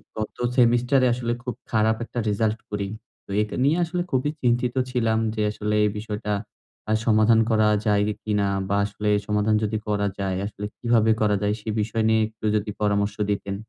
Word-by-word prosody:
গত 110 -1 -5 0.2
সেমেস্টার 120 +2 +4
এ - - +5
আসলে 120 -1 -2
খুব 125 -2 -4 0.2
খারাপ 110 0 +3
একটা 120 - -5
রেজাল্ট 110 +2 0
করি। 100 -1 -2 0.4
তো - - -30
এটা 105 - -3
নিয়ে 150 +5 +3
আসলে 175 +1 -2
খুবই 130 +2 +1
চিন্তিত 120 0 +1 0.2
ছিলাম 115 -3 +1 0.2
যে, 105 - -1
আসলে 105 0 -2
এই - - +2
বিষয়টা 105 0 -4 0.6
আ - - +1
সমাধান 110 +1 +4
করা 110 -1 +3 0.2
যায় 105 -1 +3 0.2
কিনা? 105 -2 +1 0.2
বা 100 - +1
আসলে 105 +1 -3 0.2
সমাধান 105 +1 +2
যদি 110 +1 0
করা 100 -1 0
যায়, 95 -1 -1
আসলে 105 0 -6
কিভাবে 115 -2 +3
করা 105 -1 +3
যায়? 105 0 +1
সে 110 - -6
বিষয় 110 +1 -1
নিয়ে 110 0 +3
একটু 110 0 -10
যদি 105 0 -1
পরামর্শ 100 0 +1 0.2
দিতেন? 100 -1 -2
110 Hz, 185 wpm, -24 LUFS, 105-115 Hz, 0.6 s, এ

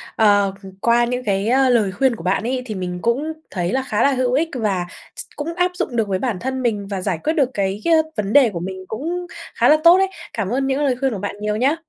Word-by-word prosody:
Ờ, 205 -3 +3
ừm, 190 - -9
qua 235 0 +3
những 250 +1 -3
cái, 200 0 0
a, 260 +1 +3
lời 220 -5 +3
khuyên 260 +5 +1
của 165 - -10
bạn 185 +4 0
ấy, 250 +2 -1
thì 220 -4 -5
mình 180 -1 -4
cũng 280 - 0 0.2
thấy 175 -1 -2
là 265 0 0
khá 220 -4 0
là 280 - +4
hữu 255 -1 0
ích, 320 +4 +1
và 195 -6 -1 0.3
x - - -4
cũng 305 +3 -4
áp 360 0 +1
dụng 345 -9 -3
được 225 -3 +1
với 190 -1 -1
bản 230 -7 -2
thân 260 +3 -3
mình 210 -5 -1
và 195 -2 -4
giải 180 -4 -1
quyết 315 - +1
được 275 -6 +2
cái, 200 0 -2
ơ, 315 -1 +3
vấn 210 0 -2
đề 270 -5 +6
của 175 -4 -5
mình 185 +1 -6
cũng 340 +10 -4 0.3
khá - - +3
là 305 - +7
tốt 340 +2 +8
đấy. 385 0 +3 0.3
Cảm 205 -4 -2
ơn 270 +3 0
những 270 +2 0
lời 260 -3 +2
khuyên 270 -2 0
của 200 - -4
bạn 205 0 -4
nhiều 210 0 -1
nhé! 265 +7 +2
235 Hz, 275 wpm, -20 LUFS, 200-270 Hz, 0.3 s, tốt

